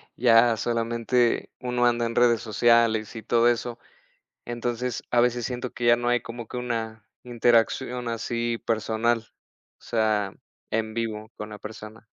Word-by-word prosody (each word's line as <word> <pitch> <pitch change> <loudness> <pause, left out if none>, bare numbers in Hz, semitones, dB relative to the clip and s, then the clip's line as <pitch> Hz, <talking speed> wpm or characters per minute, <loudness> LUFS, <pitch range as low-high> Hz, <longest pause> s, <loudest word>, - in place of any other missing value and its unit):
ya 115 -1 +5
solamente 115 +2 0
uno 125 -1 0
anda 120 0 +1
en 115 - -3
redes 120 -2 +4
sociales 115 0 +2
y 115 - -7
todo 115 +2 +3
eso, 120 0 -2 0.7
entonces, 120 0 -3
a 120 - +3
veces 120 0 +2
siento 125 0 -4
que 120 - -4
ya 120 0 +6
no 120 0 -3
hay 120 0 +2
como 115 -1 -8
que 125 - -6
una 115 -3 -4 0.2
interacción 120 +1 +1
así 115 0 -2
personal, 115 +1 +1 0.6
o - - -36
sea, 110 -3 0 0.4
en 110 0 -1
vivo 110 -1 -4
con 105 - -6
la 105 -1 -9
persona. 110 +1 -10
115 Hz, 155 wpm, -25 LUFS, 110-120 Hz, 0.7 s, ya